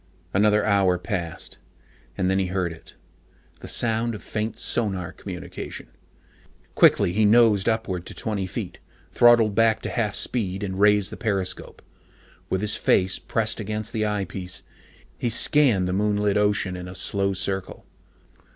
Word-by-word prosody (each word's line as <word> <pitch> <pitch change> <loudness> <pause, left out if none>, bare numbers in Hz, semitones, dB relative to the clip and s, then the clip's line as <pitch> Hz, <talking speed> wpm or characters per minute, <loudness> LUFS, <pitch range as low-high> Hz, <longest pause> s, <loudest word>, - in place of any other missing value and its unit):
Another 105 +2 +3
hour 100 -4 +3
had 90 - -17
passed. 85 -6 -5 0.6
And 90 - 0
then 95 +1 +2
he 95 - 0
heard 90 -1 -2
it. 80 - -16 0.6
The - - -10
sound 115 0 0
of 105 - -10
faint 110 0 -4
sonar 95 -7 -1
communication. - - -8 0.8
Quickly 90 - +4
he 110 +3 +2
nosed 110 -2 +4
upward 95 -6 -2
to - - -8
twenty 100 -4 -2
feet, - - -6 0.3
throttled 120 -3 +5
back 115 +1 +3
to - - -3
half 110 -4 -1
speed, 100 -5 -1
and 95 -1 -4
raised 105 -1 +4
the - - -7
periscope. 100 -6 -3 0.7
With 95 - -1
his 105 - 0
face 95 0 +2
pressed 110 0 -2
against 110 +1 -3
the 110 -1 0
eyepiece, 95 -3 -4 0.6
he 120 - 0
scanned 115 -5 +3
the 90 - -1
moonlit 105 0 +1
ocean 105 -2 +1
in 90 0 -7
a 90 - -9
slow 100 0 0
circle. 95 0 -4
105 Hz, 150 wpm, -24 LUFS, 95-110 Hz, 0.8 s, throttled